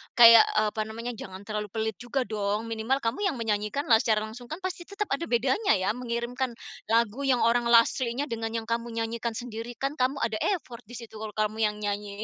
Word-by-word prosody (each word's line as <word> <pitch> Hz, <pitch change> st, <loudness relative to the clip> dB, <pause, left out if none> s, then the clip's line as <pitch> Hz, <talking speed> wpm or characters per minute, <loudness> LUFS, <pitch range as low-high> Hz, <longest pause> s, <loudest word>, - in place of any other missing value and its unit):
kayak, 230 Hz, -1 st, +10 dB
eee, 215 Hz, 0 st, +3 dB
apa 215 Hz, -, -3 dB
namanya 230 Hz, +2 st, -5 dB
jangan 190 Hz, -4 st, -9 dB
terlalu 210 Hz, 0 st, -4 dB
pelit 220 Hz, +1 st, -3 dB
juga 255 Hz, +2 st, -1 dB
dong 210 Hz, -2 st, -2 dB
minimal 225 Hz, +5 st, 0 dB
kamu 260 Hz, -, 0 dB
yang 335 Hz, -, -1 dB
menyanyikanlah 225 Hz, +2 st, +1 dB
secara 215 Hz, -2 st, +1 dB
langsung 225 Hz, +3 st, -9 dB
kan 315 Hz, +8 st, -6 dB
pasti 365 Hz, -2 st, -4 dB
tetap 400 Hz, +1 st, -3 dB
ada 305 Hz, +5 st, -1 dB
bedanya 260 Hz, -, +2 dB
ya 185 Hz, 0 st, +1 dB
mengirimkan 240 Hz, +1 st, -3 dB, 0.3 s
lagu 230 Hz, +4 st, +1 dB
yang 255 Hz, -3 st, +3 dB
orang 235 Hz, +1 st, +3 dB
aslinya 235 Hz, +2 st, +3 dB
dengan 225 Hz, -1 st, -3 dB
yang 225 Hz, -, -1 dB
kamu 230 Hz, +1 st, -2 dB, 0.2 s
nyanyikan 230 Hz, 0 st, -3 dB
sendiri 235 Hz, 0 st, -6 dB
kan 275 Hz, +3 st, -3 dB
kamu 255 Hz, +2 st, +2 dB
ada 220 Hz, -1 st, -1 dB, 0.2 s
effort 245 Hz, -9 st, -10 dB
di 245 Hz, -, -10 dB
situ 230 Hz, -2 st, -10 dB
kalau 215 Hz, -1 st, -7 dB
kamu 215 Hz, 0 st, 0 dB
yang 210 Hz, -, -4 dB
nyanyi. 205 Hz, 0 st, -3 dB
230 Hz, 200 wpm, -27 LUFS, 220-250 Hz, 0.3 s, kayak